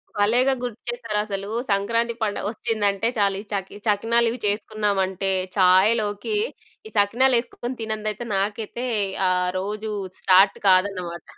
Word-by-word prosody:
భలేగా 240 +6 +3
గుర్తుచేసారసలు. 215 -4 -4 0.2
సంక్రాంతి 230 +4 +1
పండగొచ్చిందంటే 210 0 -1
చాలు 200 -1 +2
ఈ - - -13
చకి 195 -1 -3
ఈ - - -13
చకినాలివి 230 +3 +2
చేసుకున్నాంటే 200 -2 0 0.3
ఛాయ్‌లోకి 205 - +3 0.5
ఈ - - -13
సకినాలెసుకొని 240 +2 +1
తినందైతే 215 0 -3
నాకైతే 215 +5 -2 0.4
ఆ - - +2 0.3
రోజు 210 +2 -4 0.3
స్టార్ట్ 190 +1 +5
కాదన్నమాట. 185 -3 +2
210 Hz, 100 wpm, -23 LUFS, 195-230 Hz, 0.5 s, స్టార్ట్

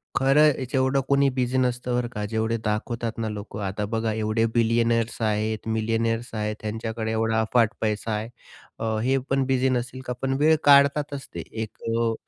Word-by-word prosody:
खरं 150 +3 +5 0.2
जेवढं 130 0 +2
कोणी 140 0 +4
बिझी 130 -1 -1
नसतं, 125 -1 0
बरं 125 -1 0
का, 105 0 -3
जेवढे 110 +2 -1
दाखवतात 115 +2 -2
ना 110 -1 -1
लोकं. 105 0 -7
आता 100 +2 -2
बघा, 110 +1 -1
एवढे 110 +1 0
बिलियनर्स 115 0 +1
आहेत, 110 0 -1
मिलियनेयर्स 115 +1 -1
आहेत, 105 0 -2
त्यांच्याकडे 110 +1 -3
एवढा 110 0 +1
अफाट 115 0 +2
पैसा 110 +1 -1
आहे 105 +1 -3
हे. - - -10 0.5
अ, 110 -1 -1
हे 135 +2 +2
पण 135 0 +2
बिझी 130 0 +2
नसेल 130 +1 -2
का? 125 - -2
पण 135 0 0
वेळ 155 +2 +5
काढतातच 140 0 +4
ते - - -5
एक 110 -1 -6
अ 115 0 +1
115 Hz, 175 wpm, -25 LUFS, 110-130 Hz, 0.5 s, खरं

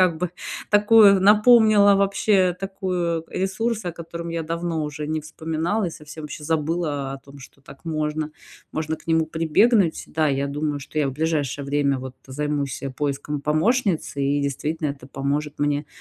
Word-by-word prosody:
как 180 -3 +4
бы 180 -1 -2 0.4
такую 205 -2 +6
напомнила, 210 -1 +6
вообще, 195 -1 +2
такую, 180 -4 -2
э, - - -5
ресурс, 210 +3 -1
о 175 - -2
котором 170 0 -7
я 165 -1 -3
давно 165 -1 -2
уже 150 0 -5
не 155 0 -1
вспоминала 160 +6 -2
и - - -3
совсем 155 0 -10
ваще 150 0 -7
забыла 155 -3 -1
о 135 - -9
том, 140 +1 -15
что 140 +1 -15
так 140 +4 -15
можно, 155 -1 -2 0.4
можно 155 0 -2
к 155 - -21
нему 160 -1 +2
прибегнуть, 165 +4 +2
да, 155 -1 +1
я 140 0 0
думаю, 145 0 -2
что 145 +2 -6
я 140 -2 +2
в - - -4
ближайшее 145 -2 -1
время, 140 -1 +1
вот, 130 0 -7
займусь, 145 0 -3
э, 135 - -3
поиском 145 +2 -3
помощницы 160 - 0
и 140 +1 +1
действительно 150 +3 -2
это 140 -1 -10
поможет 145 +2 -3
мне, 145 0 0
155 Hz, 170 wpm, -23 LUFS, 145-180 Hz, 0.4 s, такую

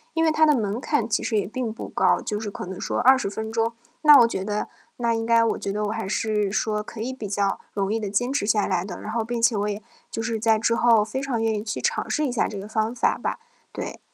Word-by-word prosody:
因 325 - +2
为 320 - +4
它 310 0 +2
的 300 - +5
门 215 +2 -2
槛 250 -8 0
其 220 - 0
实 220 - 0
也 200 - +1
并 235 +1 -3
不 225 - -7
高， - - +2
就 210 -1 -3
是 215 -2 -4
可 200 - -7
能 190 0 -7
说 - - -2
20 260 -5 +4
分 220 +2 -5
钟， 225 0 0 0.3
那 300 -2 +9
我 230 - +6
觉 190 -4 -3
得 210 +1 -2 0.3
那 235 -1 +1
应 225 0 -1
该 230 0 +4
我 225 - +1
觉 195 - -3
得 210 +1 -2
我 210 - -1
还 225 -3 -3
是 210 -1 0
说 215 0 0
可 215 +1 -10
以 255 +3 -3
比 220 -5 -6
较 195 0 0 0.2
容 200 +1 0
易 225 - 0
地 205 -2 -3
坚 245 +6 0
持 275 -7 0
下 210 -1 +3
来 180 -3 0
的， 185 -2 -7
然 215 - -5
后 225 0 0
并 235 +1 -3
且 230 0 +3
我 205 0 0
也 205 +1 -5 0.3
就 225 - -4
是 225 -1 -2
在 220 0 +3
之 230 +1 +1
后 230 -3 +4
非 265 +5 -4
常 265 -4 -2
愿 225 -1 +1
意 210 0 -3
去 210 - -3
尝 - - -1
试 305 - +1
一 260 - -1
下 240 - +1
这 205 - -6
个 200 +2 -7
方 220 +2 -1
法 - - +1
吧， - - -2 0.3
对。 - - -6
220 Hz, 300 characters per minute, -24 LUFS, 210-235 Hz, 0.3 s, 那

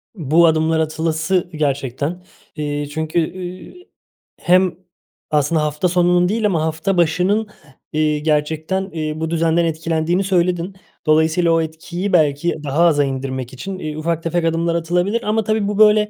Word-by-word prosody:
Bu 165 -1 +3
adımlar 160 0 +2
atılası 160 +3 0
gerçekten. 145 +3 -2 0.3
Eee, 145 -1 -3
çünkü, 160 +2 -1 0.2
ııı, 185 0 -8 0.7
hem 180 0 +3 0.6
aslında 150 +1 +2
hafta 150 +4 0
sonunun 175 0 +3
değil 220 +1 0
ama 180 -6 +1
hafta 160 +4 -1
başının, 180 +6 +2 0.5
eee, 155 -1 +1
gerçekten, 155 +5 -1
eee, 155 -2 -3
bu 160 0 -2
düzenden 165 0 +2
etkilendiğini 165 +3 0
söyledin. 180 0 0 0.3
Dolayısıyla 160 +2 +3
o 165 0 +3
etkiyi 170 +4 -4
belki 155 0 +2
daha 150 +4 +2
aza 150 -4 +4
indirmek 130 -2 -4
için, 190 +9 -6
eee, 155 -2 -5
ufak 165 +1 -2
tefek 170 0 0
adımlar 165 +1 0
atılabilir. 175 +7 0
Ama 220 +1 0
tabii 215 -1 0
bu 205 0 -2
böyle, 210 0 +5
165 Hz, 145 wpm, -19 LUFS, 155-180 Hz, 0.7 s, böyle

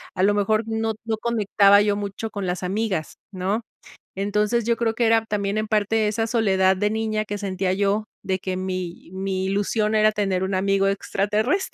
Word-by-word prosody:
a 185 - +1
lo 205 +1 +4
mejor 215 +2 +1
no 225 0 -1
no 225 -1 -1
conectaba 205 -3 +4
yo 205 -1 +2
mucho 205 +2 -4
con 200 -2 -4
las 180 +1 -3
amigas, 190 -3 -2 0.2
¿no? 195 +3 -1 0.5
Entonces, 210 +4 0
yo 235 0 +1
creo 225 -1 0
que 235 0 +2
era 225 0 +3
también, 205 -1 -2
en 215 - -2
parte 215 +1 +1
esa 225 +2 -1
soledad 190 -5 +2
de 205 +2 +1
niña 215 -1 -1
que 205 -1 -4
sentía 190 -2 -1
yo, 200 +2 0 0.2
de 190 -1 0
que 185 0 -3
mi 185 -2 -5
mi 190 0 -2
ilusión 210 +2 0
era 215 0 +4
tener 195 -3 -1
un 190 +1 -2
amigo 195 +1 +2
extraterrestre, 210 - 0
205 Hz, 190 wpm, -23 LUFS, 190-220 Hz, 0.5 s, lo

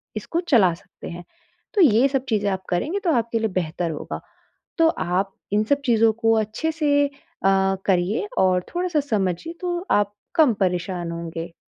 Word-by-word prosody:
इसको 335 - -2
चला 200 - +5
सकते 165 - -12
हैं, 175 0 -8 0.5
तो 405 - +3
ये 255 -3 +6
सब 270 -1 -1
चीज़ें 205 -3 +1
आप 190 0 -3
करेंगे, 305 - -1
तो 350 -4 0
आपके 230 -1 0
लिए 220 - +1
बेहतर 175 -2 -2
होगा। 150 - -6 0.6
तो 330 -1 +5
आप 190 - -1 0.2
इन 210 +1 +3
सब 280 +6 +1
चीज़ों 225 -2 +4
को 225 0 +2
अच्छे 220 +10 -1
से 290 -3 +2
अ, 280 - -18 0.7
करिए 190 +3 +1
और 185 -1 +3
थोड़ा-सा 355 -3 +1
समझिए, 215 - -1
तो 350 0 -2
आप 205 0 +2 0.2
कम 300 -7 +5
परेशान 180 -1 -1
होंगे। 165 0 -6
215 Hz, 170 wpm, -23 LUFS, 180-285 Hz, 0.7 s, ये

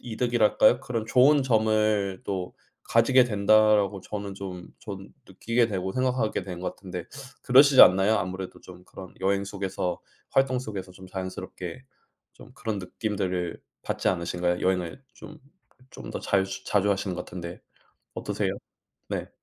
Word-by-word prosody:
이득이랄까요? 120 0 +2
'그런 115 -3 -3
좋은 135 +5 +5
점을 110 -4 +1
또 95 -2 -4 0.3
가지게 125 +3 +5
된다.'라고 105 -2 +3
저는 100 -1 -6
좀 95 -2 -7 0.2
전 100 -2 -8 0.2
느끼게 115 +5 +1
되고 95 -2 -3
생각하게 130 -4 0
된 90 -2 -7
것 95 - -4
같은데 90 -3 -7 0.4
그러시지 135 +1 +7
않나요. 95 +4 +6
아무래도 95 0 -5
좀 90 -1 -13
그런 95 -1 -11
여행 100 +1 +1
속에서 95 -3 -3 0.3
활동 130 -1 +2
속에서 100 -6 -6
좀 95 +1 -13
자연스럽게 95 +2 -7 0.5
좀 - - -15
그런 110 -2 -3
느낌들을 95 -2 -3 0.2
받지 - - -1
않으신가요? 90 0 -1
여행을 90 +5 -1
좀, 155 +1 -12 0.5
좀 - - -9
더 - - -4
잘 95 -1 +1 0.2
자주 105 0 +2
하시는 95 -1 -1
것 - - -5
같은데 85 -1 -8 0.5
어떠세요? - - -2 0.6
네. - - -3
100 Hz, 320 characters per minute, -26 LUFS, 95-110 Hz, 0.6 s, 그러시지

